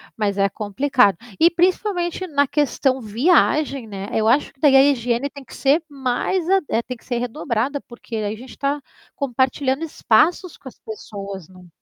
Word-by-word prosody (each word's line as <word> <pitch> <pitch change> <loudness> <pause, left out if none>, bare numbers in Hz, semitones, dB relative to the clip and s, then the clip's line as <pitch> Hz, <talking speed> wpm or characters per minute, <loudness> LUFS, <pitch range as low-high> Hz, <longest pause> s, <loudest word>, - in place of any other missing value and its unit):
mas 205 -2 -1
é 195 0 +3
complicado. 210 +1 +1 0.2
E 335 - +6
principalmente 360 0 0
na 285 -3 +2
questão 270 -2 0
viagem, 275 - +2
né, 200 -1 -6
eu 220 0 +1
acho 260 +6 +2
que 275 - -35
daí 280 -1 +5
a 270 - +8
higiene 245 +1 -1
tem 280 -1 -11
que 245 - -13
ser 290 +4 +2
mais, 275 +6 -1 0.4
tem 250 - -4
que - - -25
ser 245 - -2
redobrada 245 +2 -2
porque 240 -1 -10
aí 210 -1 -2
a - - -14
gente 255 +3 -12
tá 280 +1 -1 0.4
compartilhando 265 +2 0
espaços 325 - +1
com 265 - -11
as - - -21
pessoas 200 -4 -8
num 185 -1 -16
260 Hz, 175 wpm, -21 LUFS, 220-290 Hz, 0.4 s, a